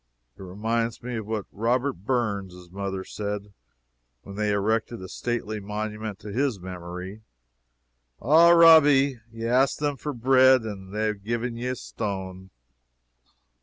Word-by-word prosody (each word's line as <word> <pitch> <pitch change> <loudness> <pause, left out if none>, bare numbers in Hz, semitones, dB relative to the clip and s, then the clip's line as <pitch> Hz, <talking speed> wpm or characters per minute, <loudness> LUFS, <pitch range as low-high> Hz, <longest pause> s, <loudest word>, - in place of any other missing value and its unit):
It - - -15
reminds 115 +5 -2
me 125 -1 -4
of 110 -2 -6
what 110 -3 -3
Robert 125 +6 0
Burns' 100 -5 -3
mother 95 0 -4
said 105 0 -5 0.7
when 100 - -10
they 105 0 -1
erected 110 +3 0
a - - -7
stately 110 +1 -3
monument 105 0 -5
to 105 - -8
his 130 -3 0
memory: 90 +2 -8 1.0
"Ah, 160 +6 +6
Robbie, 145 -6 +6
ye 115 0 -6
asked 130 +4 +2
them 145 -1 -1
for 150 - -4
bread 130 0 +4
and 95 -3 -7
they 110 +1 0
hae 100 - -16
gi'en 115 +3 -3
ye 120 +2 -4
a 125 - -1
stane." 95 -4 -6
110 Hz, 140 wpm, -25 LUFS, 100-125 Hz, 1.0 s, Ah